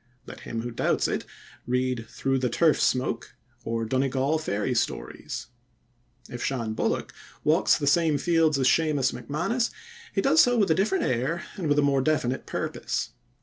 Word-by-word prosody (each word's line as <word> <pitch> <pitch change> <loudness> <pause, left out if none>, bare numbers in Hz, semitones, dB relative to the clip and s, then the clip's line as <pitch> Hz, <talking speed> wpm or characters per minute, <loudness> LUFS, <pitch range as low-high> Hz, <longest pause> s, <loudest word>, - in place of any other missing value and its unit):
Let - - -10
him 115 -1 -5
who 120 - -4
doubts - - +1
it - - -2 0.4
read 125 -2 -1
Through 135 0 -1
the 125 -1 0
Turf 155 +6 +3
Smoke 115 -3 0 0.3
or 115 0 -2
Donegal 135 +5 +1
Fairy 105 -5 -1
Stories. 120 - -3 0.8
If 120 - -6
Shan 115 -5 -2
Bullock - - -1 0.3
walks - - +4
the 145 - -3
same 155 +1 +3
fields 165 -2 +2
as 130 -1 +2
Seumas 150 -4 +2
MacManus, 175 - -1 0.4
he 195 - 0
does 160 -4 +5
so 245 0 +3
with 200 -6 +3
a - - +4
different 195 +1 +1
air 135 +8 -1
and 180 -6 -3
with 145 - +3
a 145 - +4
more 140 -1 +3
definite 130 -3 0
purpose. - - -3
135 Hz, 165 wpm, -26 LUFS, 125-160 Hz, 0.8 s, does